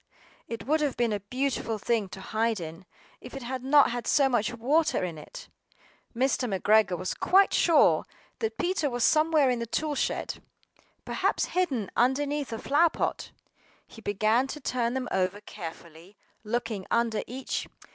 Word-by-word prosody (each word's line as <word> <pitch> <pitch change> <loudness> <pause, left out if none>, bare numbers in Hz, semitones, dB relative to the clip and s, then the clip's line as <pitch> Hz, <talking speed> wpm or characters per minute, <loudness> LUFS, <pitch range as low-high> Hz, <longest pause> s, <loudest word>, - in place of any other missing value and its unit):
It 230 - -6
would 310 +3 +2
have 290 -3 -1
been 235 -2 +1
a 205 - -1
beautiful 245 +1 -2
thing 215 -1 -1
to 190 - -9
hide 220 +1 -1
in, 165 +2 -8 0.3
if 250 - -11
it 270 - -6
had 255 +1 -4
not 280 0 +5
had 240 -1 -4
so 280 -2 +4
much 235 -5 +1
water 270 - +1
in 170 -4 -4
it. 150 - -11 0.7
MR. 250 -4 0
McGREGOR 210 -2 +3
was 185 +2 -3
quite 390 +1 +4
sure 330 -4 +4 0.3
that 445 -1 -2
Peter 350 -5 0
was 245 -2 -2
somewhere 310 -3 +4
in 245 - -1
the 235 - -4
toolshed, 295 +3 -2 0.7
perhaps - - 0
hidden 280 - 0
underneath 280 +3 +1
a 225 - -3
flower 300 +8 +3
pot. - - -3 0.5
He 225 - -14
began 215 +5 +1
to 300 - -6
turn 250 -3 -1
them 260 -1 -2
over 190 +1 0
carefully, 170 -2 -10 0.3
looking 220 -3 -3
under 230 -2 +1
each. 260 +2 -4
240 Hz, 160 wpm, -27 LUFS, 210-280 Hz, 0.7 s, not